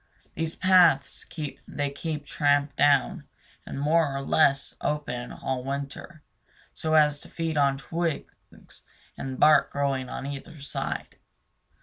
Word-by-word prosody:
These 165 0 -2
paths 180 -7 +4 0.4
they 145 -1 -2
keep 150 0 -5
tramped 145 0 +1
down 140 -2 +3 0.4
and - - -5
more 150 -1 +2
or 135 - -3
less 140 -1 +2
open 125 -5 -3
all 130 -1 -3
winter, 140 +4 -6 0.5
so 160 0 -1
as 150 -1 +4
to - - -12
feed 165 -1 -3
on 140 -2 +3
the 135 - -12
twigs 165 -2 -5 0.3
and 130 -1 -6
bark 155 0 +6
growing 135 -2 -1
on - - -5
either 140 +2 -7
side. 140 - -5
145 Hz, 130 wpm, -26 LUFS, 140-155 Hz, 0.5 s, bark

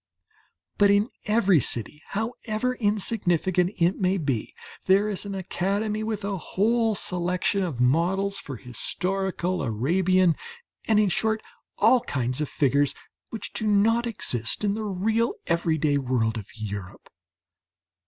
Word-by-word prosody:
But 205 -1 +6
in 205 +3 +3 0.2
every 200 -5 +4
city, 120 +4 -4
however 225 +2 -2
insignificant 195 -5 +1
it 175 +2 +2
may 190 +1 +2
be, 140 - -2 0.3
there 195 +2 +4
is 205 -1 -4
an 200 - -4
academy 200 +3 -1
with 215 -2 -3
a 200 -1 -2
whole 220 +6 +1
selection 180 +2 +1
of 160 -9 -4
models 180 +10 +2
for 135 -4 -7
historical, 185 - -2
Arabian, 170 - +2 0.5
and 220 -2 +4
in 210 -2 +3
short, 220 +3 0 0.3
all 255 - +5
kinds 130 - -2
of 150 - -2
figures, 140 0 +2 0.3
which 225 - -7
do 220 - -2
not 225 +3 +3
exist 120 - -1
in 200 -1 +2
the 215 +1 -3
real 220 +4 0
everyday 160 -4 +1
world 120 -4 0
of 105 -3 -6
Europe. 100 -4 -7
190 Hz, 135 wpm, -25 LUFS, 150-210 Hz, 0.5 s, But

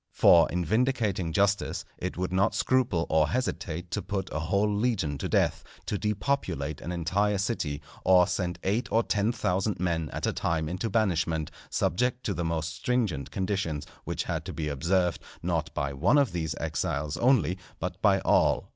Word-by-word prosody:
For 85 -1 +6
in 90 0 -1
vindicating 110 - +1
justice, 100 +3 +1
it 90 -1 -4
would 90 0 -2
not 95 +1 +2
scruple 125 -10 +2
or 80 -1 +3
hesitate 90 -9 -3
to - - -1
put 95 -2 -4
a 80 - -1
whole 100 +6 +1
legion 100 - 0
to - - -3
death, - - +1 0.2
to - - -2
depopulate 100 - -1
an 85 - -5
entire 95 +4 +1
city, 80 -8 -2 0.2
or 90 -1 +6
send 90 -1 -2
eight 105 +6 0
or 115 +1 +3
ten 105 +1 +1
thousand 95 -3 -1
men 85 -3 -1
at - - -3
a - - 0
time 80 -1 -1
into 90 +7 -2
banishment, 85 -8 0 0.2
subject 125 +6 0
to 105 - -1
the 85 - -2
most 80 0 -2
stringent 85 - -1
conditions, 95 -4 -2 0.2
which - - -2
had - - -3
to - - -5
be 75 -2 -3
observed, 85 +5 +1 0.2
not - - -1
by 70 -1 -1
one 90 - +3
of 140 -6 +3
these 80 -3 -2
exiles 75 -1 -2
only, 100 - +3 0.2
but - - -4
by - - +4
all. - - +2
90 Hz, 175 wpm, -28 LUFS, 80-105 Hz, 0.2 s, For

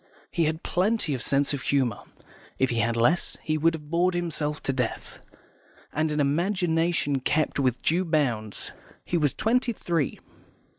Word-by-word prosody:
He 170 - +1
had 160 +2 -2
plenty 190 -3 +1
of 130 - -3
sense 140 +2 +1
of 140 - -3
humour 130 -6 +1 0.6
(if 130 -1 +2
he 120 - -1
had 115 +1 +1
had - - -3
less, 150 +10 +2
he 155 - 0
would 165 +2 +2
have 150 -1 -11
bored 175 +2 +2
himself 155 -4 -1
to 135 - 0
death), 125 -3 -3 0.7
and 155 +1 +1
an 150 0 -1
imagination 165 -1 +1
kept 150 +3 0
within 130 -3 +1
due 175 +4 +2
bounds. 125 - -1 0.3
He - - -2
was 145 -3 +1
twenty 240 +2 +1
three. 165 - -1
155 Hz, 165 wpm, -26 LUFS, 135-170 Hz, 0.7 s, if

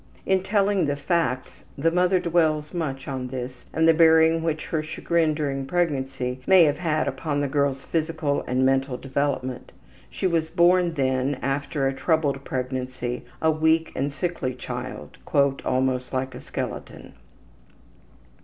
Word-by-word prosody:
In 190 -1 +2
telling 195 -3 +1
the 145 - 0
facts, 145 -4 -1
the 165 +4 +2
mother 180 +2 +3
dwells 160 -3 +1
much 140 -6 -3
on 130 -2 -3
this 125 0 -7
and 160 0 +2
the 165 - +7
bearing 160 0 +5
which 160 -1 -2
her 160 - 0
chagrin 155 0 0
during 135 -3 -2
pregnancy 135 -6 -1
may 190 -2 +7
have 150 -1 +2
had 155 -3 0
upon 145 -3 -2
the 145 - 0
girl's 140 -1 0
physical 160 -3 -1
and 130 +1 +1
mental 135 -1 +1
development. 135 -2 -2 0.4
She - - -4
was 165 -3 +1
born, 175 0 +3
then, 130 0 0
after 140 +1 -1
a 135 - 0
troubled 145 -2 0
pregnancy, 125 -1 -4 0.2
a 160 - +5
weak 160 +1 +2
and 140 +2 -1
sickly 145 -5 -3
child, 125 - -7
``almost 130 -2 +1
like 130 0 -2
a - - -8
skeleton.'' - - -6
145 Hz, 145 wpm, -24 LUFS, 130-165 Hz, 0.4 s, the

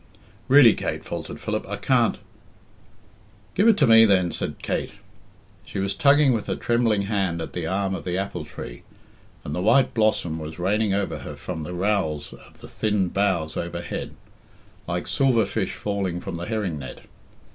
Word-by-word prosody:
"Really, 135 -4 +8
Kate," - - -4
faltered - - -6
Philip, - - -2
"I - - -2
can't - - +2 0.7
" 105 +1 -30
"Give 205 - +3
it 225 -3 +6
to 145 - +4
me, 115 -2 +8
then," 95 -5 +3
said - - -4
Kate. - - -2 0.7
She 105 - -8
was 95 0 -1
tugging 140 -1 +4
with 110 -3 -2
her - - -1
trembling 115 -4 +1
hand 100 -5 -1
at 80 - -6
the 85 -2 -3
arm 95 +1 -1
of 95 - -5
the 90 0 -2
apple 95 -4 -3
tree, - - -9 0.6
and 75 - -5
the 90 - -2
white 120 +7 +4
blossom 105 -7 +1
was 80 0 -7
raining 100 +4 +1
over 100 -1 -2
her - - -8
from 85 -3 -6
the 90 +4 -5
rowels 90 -6 -1
of - - -17
the - - -10
thin 105 -4 0
boughs 90 -6 0
overhead, 85 0 -5 0.7
like 85 +1 -2
silver 130 -6 +2
fish - - -2
falling 100 -4 -2
from 95 -1 -6
the 85 +1 -5
herring 105 -8 -2
net. 65 - -8
100 Hz, 180 wpm, -24 LUFS, 85-110 Hz, 0.7 s, Really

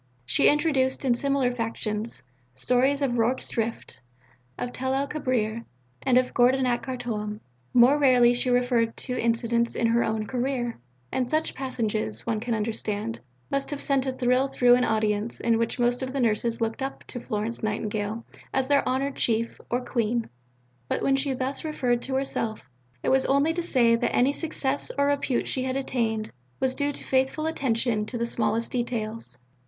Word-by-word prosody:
She 135 - +4
introduced, 285 -3 +1
in 250 - +4
similar 275 0 +1
fashion, 225 -2 -2 0.5
stories 255 - +2
of 245 -3 0
Rorke's 240 +3 +1
Drift, 230 0 -3 0.6
of 245 - -4
Tel 260 +1 -1
el 275 +1 0
Kebir, 235 -6 -1 0.4
and 255 -2 +3
of 255 0 +2
Gordon 255 +2 +4
at 240 -1 +1
Khartoum. 225 -5 -4 0.3
More 250 +4 +6
rarely 250 -3 +5
she 245 +1 +1
referred 245 -2 +2
to 250 - -3
incidents 235 0 +1
in 235 - +1
her 230 +1 +3
own 220 -1 -1
career, 245 -1 -2 0.3
and 250 -2 -1
such 310 +2 0
passages, 220 - -2
one 220 - 0
can 230 +1 -1
understand, 210 - -3 0.3
must 275 0 0
have 290 - -3
sent 275 -2 +1
a - - +1
thrill 255 +1 +2
through 245 -2 +4
an 250 0 +4
audience 215 0 0
in 230 -1 +2
which 230 0 -1
most 245 +1 +1
of 260 0 -4
the 275 - -1
Nurses 230 0 +1
looked 225 +3 -1
up 270 +1 -4
to 245 - -6
Florence 225 0 -3
Nightingale 215 +1 -2 0.3
as 265 -1 0
their 285 0 +4
"honoured 270 +2 -1
Chief" 230 0 0
or 245 +1 -1
"Queen." 235 -1 0 0.6
But - - -1
when 270 - +3
she 270 +1 0
thus 260 +2 -3
referred 250 -6 0
to 265 +1 -3
herself, 230 -5 -2 0.4
it - - +1
was 265 0 +3
only 280 +4 +3
to 345 - -1
say 245 -8 +4
that 235 +1 0
any 260 +3 +4
success 285 -3 -1
or 280 - +3
repute 285 -3 0
she 260 - -1
had 260 0 -1
attained 230 -5 -1 0.3
was 260 -1 +1
due 285 +1 0
to - - -7
faithful 265 +4 +1
attention 235 -8 0
to 240 - -4
the 235 - 0
smallest 225 0 -1
details. 230 - -3
245 Hz, 180 wpm, -26 LUFS, 230-265 Hz, 0.6 s, More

